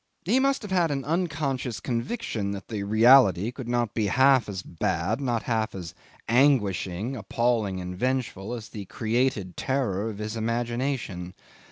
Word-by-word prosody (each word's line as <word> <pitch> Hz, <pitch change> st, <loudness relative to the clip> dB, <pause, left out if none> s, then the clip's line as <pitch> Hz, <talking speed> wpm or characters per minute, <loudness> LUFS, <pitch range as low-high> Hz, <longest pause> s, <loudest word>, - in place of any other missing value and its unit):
He 230 Hz, +9 st, +3 dB
must 275 Hz, -2 st, +1 dB
have 205 Hz, -, -7 dB
had 175 Hz, -3 st, +3 dB
an 135 Hz, -3 st, -2 dB
unconscious 140 Hz, -, -1 dB
conviction 115 Hz, -, -3 dB
that 100 Hz, -1 st, -8 dB
the 105 Hz, -3 st, -3 dB
reality 110 Hz, -1 st, +5 dB
could 130 Hz, -1 st, -8 dB
not 120 Hz, -2 st, 0 dB
be 110 Hz, -3 st, 0 dB
half 130 Hz, +1 st, +4 dB
as 95 Hz, -2 st, -5 dB
bad, 90 Hz, -, -1 dB
not 120 Hz, -4 st, -1 dB
half 110 Hz, -4 st, -1 dB
as 85 Hz, -4 st, -7 dB, 0.3 s
anguishing, 115 Hz, -4 st, +2 dB
appalling, 115 Hz, -5 st, 0 dB
and 90 Hz, 0 st, -5 dB
vengeful 125 Hz, -2 st, -2 dB
as 115 Hz, -2 st, -8 dB
the 105 Hz, -2 st, -7 dB
created 110 Hz, -4 st, -1 dB
terror 115 Hz, -6 st, -1 dB
of 105 Hz, -, -7 dB
his 105 Hz, +1 st, -4 dB
imagination. 115 Hz, -5 st, -2 dB
115 Hz, 155 wpm, -26 LUFS, 100-130 Hz, 0.3 s, reality